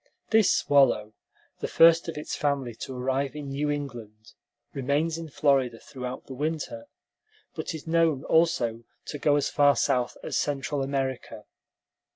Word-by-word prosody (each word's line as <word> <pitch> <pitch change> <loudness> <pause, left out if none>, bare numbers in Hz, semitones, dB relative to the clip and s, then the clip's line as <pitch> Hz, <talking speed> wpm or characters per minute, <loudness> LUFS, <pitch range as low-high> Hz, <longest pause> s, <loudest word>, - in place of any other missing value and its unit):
This 220 -3 +5
swallow, 130 -7 +3 0.5
the - - -3
first 165 0 +5
of 165 - -6
its 150 - -4
family 140 -5 -1
to 130 - -6
arrive 135 +2 -1
in 145 -2 -6
New 145 +2 -2
England, 120 -7 -6 0.4
remains 145 +5 0
in 165 -1 -7
Florida 135 -5 +2
throughout 125 +1 -7
the 135 - -8
winter, 160 - -4 0.7
but - - -5
is 155 - -9
known 160 -4 +2
also 160 -9 +2 0.2
to 145 - -6
go 145 0 +3
as 145 - +1
far 145 -1 +4
south 125 -1 0
as - - -4
Central 145 0 -1
America. 135 -2 -3
140 Hz, 150 wpm, -27 LUFS, 130-155 Hz, 0.7 s, This